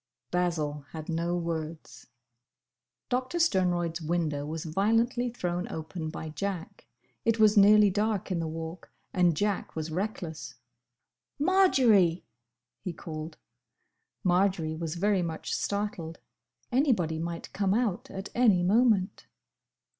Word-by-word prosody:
—" -, -, -57 dB
Basil 160 Hz, -5 st, -1 dB
had 155 Hz, -1 st, -7 dB
no 170 Hz, +1 st, 0 dB
words. 160 Hz, -6 st, -5 dB, 1.0 s
Doctor 255 Hz, +6 st, -1 dB
Sternroyd's 175 Hz, -, +1 dB
window 155 Hz, -3 st, -1 dB
was 160 Hz, +2 st, -5 dB
violently 225 Hz, +8 st, +1 dB
thrown 180 Hz, -6 st, -3 dB
open 160 Hz, 0 st, -5 dB
by 160 Hz, 0 st, -6 dB
Jack. 175 Hz, +2 st, -5 dB, 0.4 s
It 230 Hz, -1 st, +2 dB
was 215 Hz, -1 st, +5 dB
nearly 210 Hz, 0 st, +7 dB
dark 210 Hz, 0 st, -1 dB
in 175 Hz, -, 0 dB
the 165 Hz, -, -2 dB
Walk, 160 Hz, +2 st, -7 dB, 0.2 s
and 175 Hz, -4 st, +3 dB
Jack 205 Hz, 0 st, -1 dB
was 160 Hz, 0 st, -4 dB
reckless. 175 Hz, -3 st, -4 dB, 0.8 s
"Marjory!" 255 Hz, -, +4 dB, 0.5 s
he 180 Hz, -, -5 dB
called. 155 Hz, -1 st, -7 dB, 0.9 s
Marjory 180 Hz, -3 st, +2 dB
was 160 Hz, 0 st, -4 dB
very 200 Hz, +1 st, +2 dB
much 165 Hz, -2 st, -4 dB
startled. 200 Hz, -5 st, -2 dB, 0.5 s
Anybody 225 Hz, -, +2 dB
might 170 Hz, +1 st, -5 dB
come 195 Hz, 0 st, +1 dB
out 220 Hz, -6 st, -1 dB
at 195 Hz, +1 st, -6 dB
any 215 Hz, -8 st, +4 dB
moment. 210 Hz, -1 st, +2 dB
180 Hz, 120 wpm, -29 LUFS, 160-210 Hz, 1.0 s, nearly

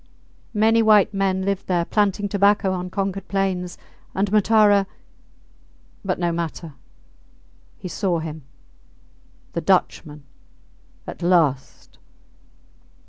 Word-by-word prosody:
Many 225 Hz, +2 st, +3 dB
white 215 Hz, -2 st, +4 dB
men 190 Hz, -1 st, 0 dB
lived 200 Hz, 0 st, -2 dB
there, 175 Hz, -2 st, 0 dB
planting 205 Hz, 0 st, 0 dB
tobacco 200 Hz, -1 st, +2 dB
on 180 Hz, 0 st, -4 dB
conquered 195 Hz, 0 st, -3 dB
plains, 190 Hz, -2 st, -2 dB, 0.4 s
and 195 Hz, +1 st, 0 dB
Matara... 210 Hz, -2 st, +4 dB, 1.2 s
But 185 Hz, -2 st, -2 dB
no 175 Hz, -1 st, -1 dB
matter. 165 Hz, -1 st, -5 dB, 1.0 s
He -, -, -8 dB
saw 180 Hz, -1 st, -1 dB
him!... 160 Hz, -1 st, -6 dB, 1.1 s
The -, -, -2 dB
Dutchman!... 150 Hz, -1 st, 0 dB, 0.8 s
At -, -, -9 dB
last! 165 Hz, -7 st, 0 dB
190 Hz, 100 wpm, -22 LUFS, 175-205 Hz, 1.2 s, white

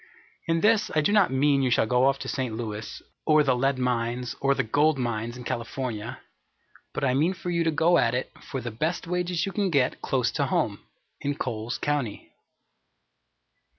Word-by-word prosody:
In 165 Hz, 0 st, +1 dB
this, 215 Hz, -1 st, +3 dB
I 155 Hz, -, +4 dB
do 150 Hz, -, +2 dB
not 210 Hz, -3 st, +5 dB
mean 140 Hz, +1 st, +3 dB
you 130 Hz, -, +2 dB
shall 120 Hz, -, +3 dB
go 125 Hz, +3 st, +3 dB
off 135 Hz, 0 st, +2 dB
to -, -, -5 dB
St. 130 Hz, -5 st, -2 dB
Louis, 110 Hz, -2 st, -6 dB, 0.2 s
or 155 Hz, -1 st, +5 dB
the 130 Hz, -3 st, +2 dB
lead 135 Hz, +2 st, +1 dB
mines, 125 Hz, 0 st, -1 dB
or 140 Hz, 0 st, +3 dB
the 135 Hz, -, +1 dB
gold 145 Hz, +6 st, +2 dB
mines, 120 Hz, -1 st, -2 dB
in 125 Hz, -, -8 dB
California, 120 Hz, -2 st, -4 dB, 0.7 s
but -, -, -4 dB
I 130 Hz, -2 st, +3 dB
mean 160 Hz, +8 st, +2 dB
for 175 Hz, 0 st, -4 dB
you 170 Hz, -1 st, +1 dB
to 165 Hz, -, +2 dB
go 165 Hz, +3 st, +3 dB
at 115 Hz, +1 st, +2 dB
it 125 Hz, -, -2 dB
for 135 Hz, -, -5 dB
the 120 Hz, 0 st, -5 dB
best 155 Hz, +10 st, -2 dB
wages 180 Hz, 0 st, -1 dB
you 195 Hz, -, -3 dB
can 200 Hz, -1 st, 0 dB
get 135 Hz, -6 st, +1 dB
close 125 Hz, -3 st, 0 dB
to -, -, 0 dB
home, -, -, 0 dB, 0.4 s
in 145 Hz, 0 st, -2 dB
Coles 120 Hz, -3 st, -3 dB
County. 140 Hz, -8 st, -2 dB
135 Hz, 195 wpm, -26 LUFS, 120-160 Hz, 0.7 s, not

